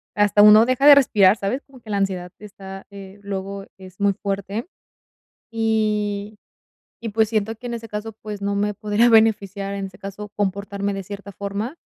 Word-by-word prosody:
hasta 205 0 +4
uno 210 +2 +8
deja 255 +3 +2
de 290 - +11
respirar, 210 -8 +5
¿sabes?, 230 +7 -3
como 260 -3 -17
que 220 - -15
la 205 - -1
ansiedad 185 -3 -2
te 210 - -12
está, 195 -1 -10
eh, 200 0 -12
luego 195 0 -5
es 185 0 -14
muy 200 0 +2
fuerte, 200 - -4 0.9
y 215 -2 -1 0.7
y 230 - -3
pues, 220 0 +1
siento 220 0 -1
que 245 - -14
en 240 - -4
ese 230 -1 -6
caso, 210 +1 -5
pues, 210 -2 -7
no 200 - -1
me 205 0 -1
podría 210 +4 +2
beneficiar, 205 -3 +2
en 195 -1 -4
ese 185 - -16
caso, 200 +1 -8
comportarme 200 0 -2
de 195 - -4
cierta 200 +1 -9
forma, 200 - -5
205 Hz, 185 wpm, -22 LUFS, 195-220 Hz, 0.9 s, de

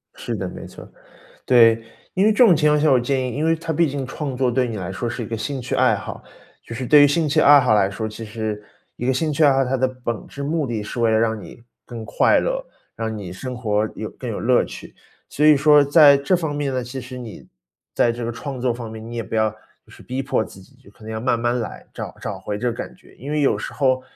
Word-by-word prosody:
是 - - -5
的， - - -4
没 - - -9
错。 - - -12 0.6
对， 115 -2 +5 0.3
因 190 - +2
为 215 - +5
这 245 +4 +5
种 185 -7 +6
情 150 0 +2
况 150 0 +3
下， 155 - +3
我 130 - +5
建 130 +1 -1
议 - - -6
因 155 - -1
为 165 0 +3
它 165 0 -4
毕 165 +1 +2
竟 135 -2 -4
创 135 -1 -5
作 130 -1 +1
对 125 0 0
你 110 - -5
来 95 -1 -5
说 120 +5 -3
是 120 +1 -4
一 - - -5
个 115 +1 -4
兴 135 +4 -4
趣 120 - -4
爱 - - +3
好， - - -8 0.4
就 115 - -9
是 125 +1 -4
对 150 +2 +7
于 145 - +8
兴 155 +1 +1
趣 155 +2 +2
爱 145 -1 +8
好 125 -4 +3
来 100 -2 +3
说， 110 +2 -4
其 110 +1 -8
实 110 -1 -4 0.3
一 120 - -4
个 130 - +3
兴 155 +3 -1
趣 155 +1 +2
爱 140 - +6
好， 135 0 +2
它 130 +1 -1
的 130 0 +2
本 120 -4 -5
质 140 - -8
目 155 +1 -1
的 115 -4 -3
是 110 +3 -6
为 115 -1 +3
了 110 - +3
让 110 -1 0
你 100 +6 -12 0.2
更 115 -2 -8
快 - - +3
乐， - - -2 0.3
让 110 -1 -4
你 95 -4 -7
生 125 +6 -6
活 110 -3 0
有 - - -5
更 - - -7
有 - - -4
乐 - - +3
趣。 - - -10 0.3
所 150 - -1
以 155 -1 +7
说 150 0 +6
在 145 -1 +7
这 140 +7 +1
方 160 -4 -3
面 145 -2 -2
呢， 130 -1 -2
其 130 +2 -6
实 125 +1 -9
你 115 -3 -10 0.5
在 120 - +3
这 120 0 -5
个 120 - -2
创 130 +2 -6
作 125 -1 +1
方 115 -1 -7
面， 110 0 -9
你 120 +1 -8
也 115 - -2
不 110 - -8
要 110 0 +2 0.3
就 - - -22
是 - - -15
逼 130 +2 -4
迫 130 -5 0
自 95 - -13
己， 95 - -19
就 - - -20
可 105 - -22
能 110 +1 -7
要 110 - -3
慢 120 0 0
慢 120 +1 0
来， 115 - -6
找 - - -7
找 100 -2 -5
回 105 +2 -5
这 120 +2 -1
个 - - -1
感 - - -7
觉。 - - -21
因 140 +4 -8
为 150 - 0
有 140 - +2
时 - - -6
候， 130 -2 +1
125 Hz, 300 characters per minute, -21 LUFS, 115-145 Hz, 0.6 s, 于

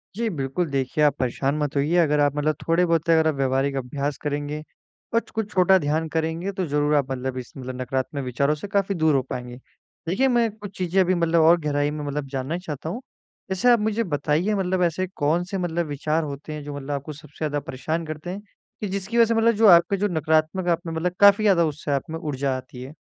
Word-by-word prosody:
जी, 230 0 -1
बिल्कुल 150 +1 -2
देखिए, 140 +3 0
आप 145 -1 +4
परेशान 135 +3 0
मत 145 -1 -2
होइए 145 +5 +1
अगर 150 -3 +3
आप 145 0 +2
मतलब 150 0 0
थोड़े-बहुत 165 -1 +2
अगर 160 -1 +5
आप 155 - +2
व्यावहारिक 135 +1 0
अभ्यास 140 +3 -3
करेंगे 145 +1 -3 0.5
अच 230 - +1
कुछ 220 -2 -4
छोटा 190 +1 +5
ध्यान 155 +2 -1
करेंगे 165 +4 -2
तो 185 -2 -3
ज़रूर 145 +1 +1
आप 135 -2 +1
अंधविश 130 -1 -4
मतलब 130 0 -6
नकारात्मक 130 +2 -2
विचारों 140 +4 0
से 175 +7 -7
काफ़ी 200 -1 0
दूर 155 -3 +3
हो 135 - +3
पाएँगे। 125 -1 -6 0.5
देखिए, 230 +10 +2
मैं 240 -3 +2
कुछ 205 -2 -10
चीज़ें 185 +1 0
अभी 185 0 +2
मतलब 170 -1 +2
और 165 +2 +6
गहराई 145 0 0
में 150 -1 -5
मतलब 145 0 -3
जानना 135 +5 -3
चाहता 160 -3 -6
हूँ। 235 +9 -5 0.5
जैसे 190 +7 +2
आप 235 - +5
मुझे 220 +2 0
बताइए 155 +4 0
मतलब 185 -1 0
ऐसे 175 +2 0
कौन-से 175 +6 0
मतलब 170 -1 -1
विचार 155 +3 -1
होते 145 +1 -6
हैं 150 -1 -6
जो 145 0 -6
मतलब 145 +1 -6
आपको 145 +2 -4
सबसे 145 0 -15
ज़्यादा 145 -1 -1
परेशान 160 +3 -4
करते 155 +3 -6
हैं, 195 +3 -5 0.4
कि 210 - -2
जिसकी 200 +4 -3
वजह 230 - +7
से 230 - 0
मतलब 225 +1 +4
जो 220 0 +5
आपके 175 +2 +6
जो 205 +2 +1
नकारात्मक 160 +2 0
आप 170 - +2
में 165 - -4
मतलब 175 +2 -1
काफ़ी 200 +1 +7
ज़्यादा 190 -5 +4
उससे 150 -1 -4
आप 140 +2 -1
में 160 0 -4
ऊर्जा 140 -3 -2
आती 125 -1 -10
है? 135 +4 -9
155 Hz, 220 wpm, -24 LUFS, 145-180 Hz, 0.5 s, वजह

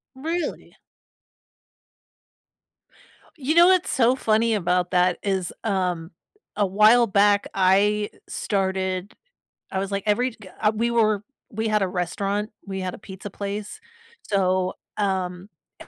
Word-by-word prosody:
Really? 320 +4 -4 2.6
You 295 +1 0
know 345 +1 +8
what's 370 -1 +3
so 250 0 +3
funny 225 -2 +2
about 180 -2 0
that 180 -1 +3
is, 190 -3 -1
um, 180 -5 -1 0.4
a 205 0 +2
while 215 +5 +5
back 205 -1 +3
I 200 +2 +3 0.2
started 190 -1 -2 0.6
I 190 - -1
was 195 +1 -3
like 200 -1 -2
every 245 +5 +1
g - - -19 0.2
uh, 210 - +4
we 235 +2 0
were 215 -3 +2 0.3
we 220 +1 -2
had 210 -1 +2
a 190 - 0
restaurant, 195 +4 -2 0.2
we 190 -1 -4
had 185 -1 -3
a - - -14
pizza 195 0 -9
place. 205 +1 -5 0.5
So 185 -2 +1 0.2
um, 190 -2 -2 0.3
a - - -12
200 Hz, 130 wpm, -24 LUFS, 190-220 Hz, 2.6 s, know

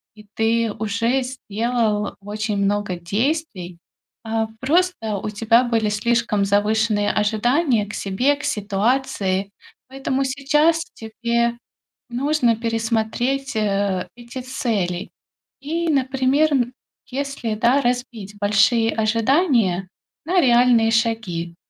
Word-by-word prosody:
и 210 -1 -16
ты 225 0 +1
уже 225 +5 0
сделал 230 -3 -2
очень 210 +1 -3
много 200 -1 0
действий, 195 - -2 0.4
а 225 0 -1
просто, 285 - 0
у 205 - -4
тебя 225 +3 +3
были 225 -3 0
слишком 215 -1 +1
завышенные 210 +1 +1
ожидания 225 +3 +1
к 210 - -8
себе, 245 +9 +1
к 285 - -11
ситуации. 200 -2 0 0.4
Поэтому, 270 0 -2
сейчас 295 +5 +2
тебе 235 +1 -1 0.5
нужно 250 -1 +1
пересмотреть, 230 +4 -1
а, 200 -3 0
эти 240 +2 -8
цели. 215 -9 -2 0.5
И, 330 +4 -2
например, 270 +2 +2 0.6
если, 270 -4 -3
да, 240 +6 +3
разбить 245 -5 -3
большие 210 +3 +3
ожидания 225 - +2 0.4
на 360 +2 +3
реальные 240 -3 +4
шаги. 220 -7 -1
230 Hz, 100 wpm, -21 LUFS, 210-260 Hz, 0.6 s, реальные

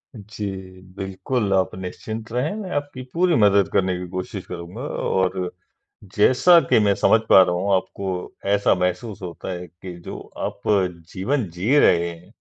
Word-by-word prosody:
जी 105 0 -7 0.5
बिल्कुल, 100 +3 -2
आप 95 -1 +1
निश्चिंत 110 +5 -6
रहें, 125 +8 -1
मैं 200 -4 -6
आपकी 145 -2 -3
पूरी 175 0 +3
मदद 100 -4 +4
करने 95 -1 +2
की 90 - -6
कोशिश 95 +1 -5
करूँगा 90 +6 -8
और 95 -9 -1 0.6
जैसा 130 +11 +6
कि - - +5
मैं 100 -1 +3
समझ 110 - +4
पा 95 - +9
रहा 90 - -1
हूँ 95 +2 0
आपको 95 +1 -3 0.4
ऐसा 100 0 +3
महसूस 95 +4 -2
होता 90 0 -6
है 90 0 -6
कि 90 +2 -10
जो - - -6 0.2
आप - - -4 0.5
जीवन 105 +2 -1
जी 100 - +1
रहे 85 -6 +4
हैं, 85 +4 -12
100 Hz, 160 wpm, -22 LUFS, 90-115 Hz, 0.6 s, पा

